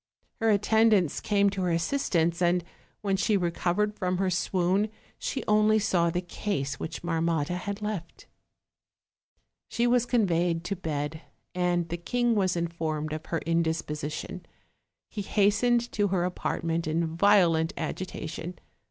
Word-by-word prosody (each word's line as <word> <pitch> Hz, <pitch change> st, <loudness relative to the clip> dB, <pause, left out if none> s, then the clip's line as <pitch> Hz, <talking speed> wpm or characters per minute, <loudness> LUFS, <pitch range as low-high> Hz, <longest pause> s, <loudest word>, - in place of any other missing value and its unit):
Her 225 Hz, -1 st, +2 dB
attendants 210 Hz, -4 st, +3 dB
came 200 Hz, -1 st, +2 dB
to 195 Hz, -1 st, -3 dB
her 180 Hz, -, +1 dB
assistance, 170 Hz, -2 st, 0 dB
and 175 Hz, 0 st, +3 dB, 0.4 s
when 195 Hz, -2 st, +1 dB
she 200 Hz, +2 st, +2 dB
recovered 180 Hz, +3 st, 0 dB
from 185 Hz, -3 st, -1 dB
her 190 Hz, 0 st, +1 dB
swoon 185 Hz, +3 st, +1 dB, 0.3 s
she 265 Hz, -, -3 dB
only 215 Hz, +1 st, +4 dB
saw 175 Hz, -5 st, +2 dB
the 175 Hz, +2 st, -1 dB
case 145 Hz, -7 st, -3 dB
which 160 Hz, +1 st, -5 dB
Marmotta 165 Hz, -2 st, 0 dB
had 200 Hz, +3 st, -5 dB
left. 200 Hz, -6 st, -5 dB, 1.4 s
She 235 Hz, -, 0 dB
was 245 Hz, 0 st, +3 dB
conveyed 175 Hz, -8 st, +1 dB
to 200 Hz, +3 st, -2 dB
bed, 155 Hz, -3 st, -3 dB, 0.3 s
and 175 Hz, -1 st, +1 dB
the 170 Hz, -, -2 dB
king 240 Hz, +7 st, 0 dB
was 190 Hz, -4 st, +1 dB
informed 160 Hz, -3 st, -2 dB
of 155 Hz, -, -6 dB
her 165 Hz, -, -2 dB
indisposition; 160 Hz, -2 st, -2 dB, 0.6 s
he 210 Hz, -, -5 dB
hastened 225 Hz, +5 st, +2 dB
to 205 Hz, -1 st, +1 dB
her 185 Hz, -2 st, 0 dB
apartment 165 Hz, -2 st, -2 dB
in 160 Hz, +1 st, -1 dB
violent 170 Hz, -4 st, +4 dB
agitation. 170 Hz, +1 st, -5 dB
180 Hz, 135 wpm, -28 LUFS, 165-205 Hz, 1.4 s, only